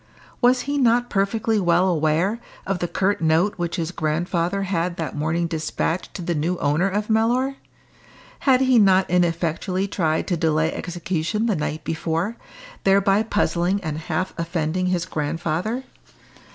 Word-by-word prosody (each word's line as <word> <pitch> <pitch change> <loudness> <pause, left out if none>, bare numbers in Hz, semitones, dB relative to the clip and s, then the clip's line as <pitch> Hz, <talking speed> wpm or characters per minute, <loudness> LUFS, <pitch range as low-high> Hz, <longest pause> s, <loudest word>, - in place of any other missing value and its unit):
Was 250 0 +4
he 285 +2 -2
not 245 -1 +3
perfectly 215 +2 +1
well 175 0 +3
aware 170 +5 +1 0.3
of 195 -2 -1
the 175 - -1
curt 195 +1 0
note 165 +5 +3
which 170 -1 -2
his 170 0 -2
grandfather 170 +4 -1
had 175 -2 -1
that 160 -2 -4
morning 160 +3 0
despatched 165 +1 -2
to 180 - -5
the 170 - -1
new 165 +4 -1
owner 155 +6 +1
of 205 +2 -2
Mellor? 245 +5 +1 0.8
Had 260 -2 +3
he 260 -2 +5
not 190 -2 +4
ineffectually 175 +2 0
tried 160 -5 0
to 180 - +2
delay 160 0 +1
execution 175 +4 -2
the 220 -4 +1
night 150 0 -3
before, 165 +6 -2 0.5
thereby 195 +1 +4
puzzling 200 -3 0
and 155 -2 -3
half 175 +3 -2
offending 170 +1 -1
his 180 -2 0
grandfather? 170 - -2
180 Hz, 150 wpm, -23 LUFS, 165-205 Hz, 0.8 s, he